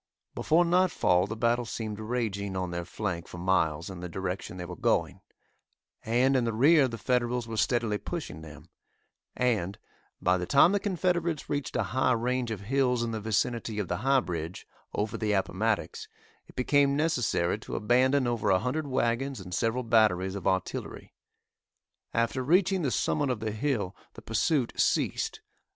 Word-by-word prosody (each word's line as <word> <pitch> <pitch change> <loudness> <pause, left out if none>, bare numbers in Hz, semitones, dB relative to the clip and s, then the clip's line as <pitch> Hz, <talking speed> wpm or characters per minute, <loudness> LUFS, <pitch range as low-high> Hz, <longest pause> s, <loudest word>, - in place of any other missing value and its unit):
Before 170 +3 +3
nightfall 170 - +3
the 110 - -4
battle 120 +2 +1
seemed 110 -2 -5
raging 110 -4 -2
on 90 -1 -2
their 85 0 -4
flank 90 -2 -4
for - - -9
miles 85 -3 +1
in 95 -3 -7
the 90 0 -6
direction 95 +1 -4
they 90 - -5
were 90 0 -7
going, - - 0 0.8
and 125 +4 +2
in 130 - +3
the 115 -1 -1
rear 140 +5 +5
the 115 -2 -6
Federals 120 0 0
were 115 - -5
steadily 110 -2 +1
pushing 165 - -6
them, 75 -2 -12 0.7
and, 110 -6 0 0.4
by 90 0 +2
the 90 - -4
time 140 +5 +6
the 205 - +2
Confederates 175 -5 -1
reached 145 -3 -2
a - - +2
high 130 -1 +3
range 125 +1 -1
of 110 -3 -4
hills 125 +1 +1
in 115 - -2
the 110 -1 -4
vicinity 110 +1 -1
of 105 -4 -2
the 90 - -1
"High 135 +5 +3
Bridge," 85 -2 -5 0.3
over 105 +1 -2
the 105 -2 0
Appomattox, 110 - -1 0.4
it - - -17
became 140 +2 +3
necessary 125 - +1
to - - -7
abandon 130 +4 +3
over 115 -3 0
a 95 - +5
hundred 145 +8 -2
wagons 130 0 0
and 90 -1 -9
several 115 +6 0
batteries 105 -5 +3
of 100 -2 -4
artillery. 95 -1 -3 1.0
After 115 +3 0
reaching 185 +6 +3
the 145 - 0
summit 140 +7 0
of 125 -3 -1
the 110 0 -3
hill, 110 -4 -2 0.2
the - - -11
pursuit 125 +3 0
ceased. - - 0
115 Hz, 170 wpm, -28 LUFS, 95-130 Hz, 1.0 s, time